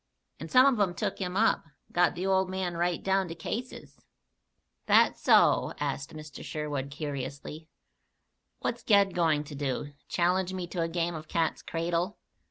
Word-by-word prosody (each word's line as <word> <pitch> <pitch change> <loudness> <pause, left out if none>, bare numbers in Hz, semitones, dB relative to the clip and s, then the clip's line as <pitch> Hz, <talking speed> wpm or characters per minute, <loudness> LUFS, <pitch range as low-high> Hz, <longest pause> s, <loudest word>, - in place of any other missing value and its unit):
"And - - -7
some 255 +1 +7
of 270 -5 +3
'em 185 -4 +1
took - - -2
him 185 -1 -3
up, 225 -4 +3 0.3
got 175 0 +3
the 180 +2 -3
old 190 -1 +2
man 185 -2 -2
right 175 0 -1
down 195 -1 +1
to 165 - -6
cases." 245 +8 -6 0.9
"That - - +5
so?" - - +4
asked 140 0 -3
Mr. 155 -1 -9
Sherwood 145 -3 -4
curiously. 145 +1 -6 0.9
"What's 240 0 -2
Ged 200 -4 +4
going 160 -4 +2
to 150 - -10
do? 145 0 -3
Challenge 185 +2 +1
me 180 -1 -3
to 175 - -3
a 165 - +1
game 170 +1 -1
of 155 -1 -7
cat's 165 -1 0
cradle? 170 +4 -2
170 Hz, 165 wpm, -29 LUFS, 150-190 Hz, 0.9 s, some